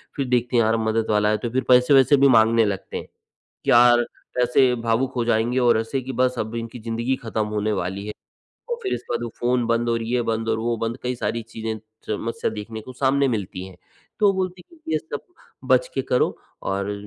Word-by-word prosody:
फिर 140 - -1
देखते 125 0 0
हैं 115 - +5
यार 110 +1 +2
मदद 110 0 0
वाला 105 0 +3
है 110 - +2
तो 120 +3 -4
फिर 130 +2 -1
पैसे-वैसे 130 +2 +6
भी 140 +1 +5
माँगने 115 -2 +5
लगते 100 -2 -3
हैं। - - -7 0.6
कि - - +1
यार 120 0 +6 0.4
ऐसे 125 +1 +4
भावुक 115 +3 0
हो 120 - +1
जाएँगे 120 +2 +1
और 120 -3 +4
ऐसे 130 +4 -2
कि 130 +1 -6
बस 125 +1 +1
अब 110 +1 -3
इनकी 115 +1 -5
जिंदगी 115 +3 -2
खत्म 110 -2 -1
होने 105 0 -1
वाली 95 +1 -3
है 105 - -4 0.6
और 475 - -1
फिर 390 - -1
इसके - - -6
बाद - - -1
वो - - -4
फ़ोन 120 0 +1
बंद 115 +1 +1
और 115 -1 0
ये 120 +2 0
बंद 115 0 -2
और 110 - +1
वो 115 +1 -1
बंद 115 +1 -3
कई 125 0 -1
सारी 115 -1 -2
चीज़ें 110 0 -5 0.3
समस्या 115 +6 -2
देखने 110 +1 -7
को 130 +4 -10
सामने 135 +2 +2
मिलती 100 -5 -3
हैं। 95 - -13 0.4
तो 210 - +5
वो 200 - +5
बोलती 185 -1 -3
है - - -16
कि - - -4
ये 155 - +2
सब 145 -1 -7 0.5
बच - - +4
के - - 0
करो - - +1 0.3
और 100 +1 -2
अ, - - -1
115 Hz, 230 wpm, -23 LUFS, 110-125 Hz, 0.6 s, पैसे-वैसे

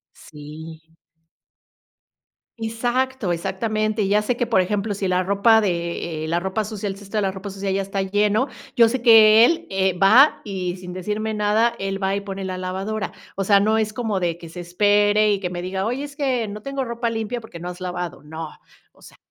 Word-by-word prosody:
sí. 160 +2 -12 1.6
Exacto, 240 -1 -1
exactamente, 215 +4 -1
ya 205 +2 +3
sé 240 +3 -1
que 245 - -1
por 220 -5 +3
ejemplo 205 +2 -1
si 195 -1 -2
la 185 0 +1
ropa 200 +4 +4
de 170 -4 -2
eh, - - -3
la 170 +1 +1
ropa 190 +4 -2
sucia, 210 -1 -5
el 195 - -3
cesto 200 +2 -7
de - - +2
la 190 - 0
ropa 195 +1 -7
sucia 195 0 -4
ya 195 +1 0
está 195 0 -3
lleno, 205 +5 +1 0.3
yo 230 -1 +7
sé 255 +2 -2
que 225 -2 +8
él 330 +7 +2
eh, 190 0 +1
va 245 +10 +6
y 185 -3 -3
sin 180 -1 -9
decirme 210 +4 -3
nada, 215 +3 +2
él 195 0 -3
va 195 0 0
y 200 - -2
pone 195 -1 -6
la 185 -1 -4
lavadora. 190 +4 -3 0.2
O 195 - -1
sea, 200 +1 +5
no 215 +2 +2
es 215 -1 0
como 215 -4 -2
de 170 -1 -1
que 170 - -11
se 175 +2 -8
espere 205 +3 +3
y 195 - -2
que 180 - -2
me 175 -1 -5
diga: 190 +1 -3
"Oye, 250 +6 -2
es 285 - -11
que 260 -6 0
no 210 +1 -7
tengo 275 0 -3
ropa 235 0 -2
limpia 230 +1 -3
porque 220 -6 -11
no 175 - -6
has 180 +1 -8
lavado". 180 -3 -5
No, 160 +1 -7 0.4
o - - -25
sea, - - -16
200 Hz, 210 wpm, -22 LUFS, 185-220 Hz, 1.6 s, que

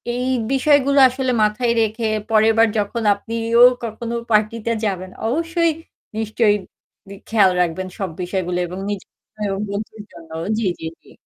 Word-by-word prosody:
এই 250 +1 -2 0.3
বিষয়গুলো 280 0 +3
আসলে 260 0 -2
মাথায় 230 +3 +1
রেখে 220 +1 -1 0.2
পরেরবার 225 +1 +4
যখন 215 +3 -2
আপনিও 230 +3 0 0.2
কখনো 230 +1 -5 0.2
পার্টিতে 215 +2 +1
যাবেন 185 -2 -3 0.2
অবশ্যই 330 +5 +1 0.5
নিশ্চয়ই 215 -1 +2 0.5
গি 200 - -8
খেয়াল 205 -4 +4
রাখবেন 180 +2 -1
সব 190 -3 -2
বিষয়গুলো 180 -1 -2
এবং 180 +2 -7
নিজের 205 -2 -6 0.4
ও - - -2
বন্ধুর 210 +1 -6
জন্য। 165 -1 -14 0.3
জ্বী, 220 -4 0
জ্বী, 160 - -5
জ্বী। - - -20
220 Hz, 140 wpm, -20 LUFS, 200-235 Hz, 0.5 s, পরেরবার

